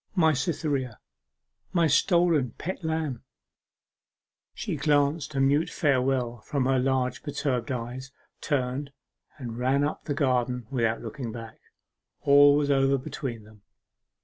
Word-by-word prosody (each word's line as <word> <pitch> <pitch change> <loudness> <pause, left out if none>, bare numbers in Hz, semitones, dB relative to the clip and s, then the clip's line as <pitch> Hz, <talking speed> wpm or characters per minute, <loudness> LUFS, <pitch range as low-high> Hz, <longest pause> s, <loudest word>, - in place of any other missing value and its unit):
'My 160 -4 +4
Cytherea! 140 - -2 0.8
my 170 -2 +3
stolen 160 - +3
pet 185 +1 -5
lamb!' 160 -6 -2 1.3
She - - -3
glanced 145 +1 +1
a - - 0
mute 140 +4 +3
farewell 130 -4 0
from 135 +3 -2
her 130 0 +2
large 130 -1 0
perturbed 140 -5 -2
eyes, 125 +2 -5 0.3
turned, 140 0 -2 0.5
and 120 -4 -6
ran 135 +3 +2
up 150 - -3
the 145 - -2
garden 125 -4 0
without 115 -3 0
looking 125 -6 -5
back. 115 -1 -9 0.6
All 145 0 +6
was 145 -1 +1
over 135 0 +3
between 125 -3 -6
them. 105 -1 -18
135 Hz, 125 wpm, -27 LUFS, 125-145 Hz, 1.3 s, All